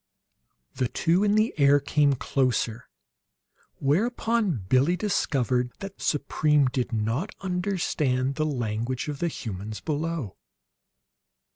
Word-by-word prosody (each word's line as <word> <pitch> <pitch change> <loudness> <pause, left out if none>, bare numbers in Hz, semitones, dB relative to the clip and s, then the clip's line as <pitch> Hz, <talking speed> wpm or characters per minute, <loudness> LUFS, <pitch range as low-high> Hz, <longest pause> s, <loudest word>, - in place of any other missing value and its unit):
The 130 -1 0
two 170 - +1
in 205 0 +3
the 215 +2 +2
air 140 0 +6
came 145 0 +2
closer; 125 -3 -1 0.9
whereupon 200 - 0
Billie 140 - +3
discovered 125 - 0
that 195 -1 -9
Supreme 150 0 +2
did 125 -1 -1
not 115 - -2
understand 170 -8 0
the 155 +2 -1
language 120 -1 -2
of 145 -2 -4
the 175 - 0
humans 105 - -5
below. 155 - -3
140 Hz, 110 wpm, -26 LUFS, 125-175 Hz, 0.9 s, air